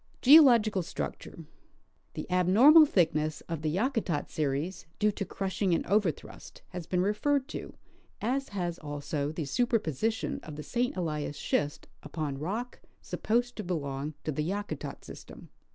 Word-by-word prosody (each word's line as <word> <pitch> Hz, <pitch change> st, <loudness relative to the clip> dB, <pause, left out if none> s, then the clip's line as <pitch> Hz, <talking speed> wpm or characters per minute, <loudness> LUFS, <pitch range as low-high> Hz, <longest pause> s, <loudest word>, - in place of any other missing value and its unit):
Geological 240 Hz, -9 st, +7 dB
Structure. 165 Hz, -1 st, -6 dB, 0.7 s
The -, -, -4 dB
abnormal 230 Hz, -, +7 dB
thickness 155 Hz, -, +1 dB
of 165 Hz, -3 st, -5 dB
the 155 Hz, -, 0 dB
Yakutat 205 Hz, -, -1 dB
series, 155 Hz, +4 st, -2 dB
due 210 Hz, -1 st, +2 dB
to 200 Hz, -, -4 dB
crushing 190 Hz, 0 st, -1 dB
and -, -, -2 dB
overthrust, 195 Hz, -5 st, -2 dB
has 175 Hz, -2 st, -7 dB
been 180 Hz, -1 st, +1 dB
referred 265 Hz, +7 st, +1 dB
to, -, -, -7 dB, 0.4 s
as 265 Hz, +5 st, -1 dB
has 175 Hz, -4 st, -3 dB
also 145 Hz, -1 st, -3 dB
the 160 Hz, 0 st, -4 dB
superposi 220 Hz, -, 0 dB
tion 225 Hz, -, -4 dB
of 155 Hz, -, -9 dB
the 150 Hz, -, -7 dB
St. 245 Hz, +2 st, -1 dB
Elias 150 Hz, -4 st, -3 dB
schist 145 Hz, 0 st, -1 dB
upon 150 Hz, -2 st, -4 dB
rock 215 Hz, -, -4 dB, 0.2 s
sapposed 245 Hz, +3 st, -1 dB
to 210 Hz, -, -4 dB
belong 145 Hz, -4 st, -3 dB
to 155 Hz, -, -2 dB
the 150 Hz, -, -2 dB
Yakutat 200 Hz, +5 st, -4 dB
system. -, -, -11 dB
180 Hz, 145 wpm, -29 LUFS, 155-225 Hz, 0.7 s, Geological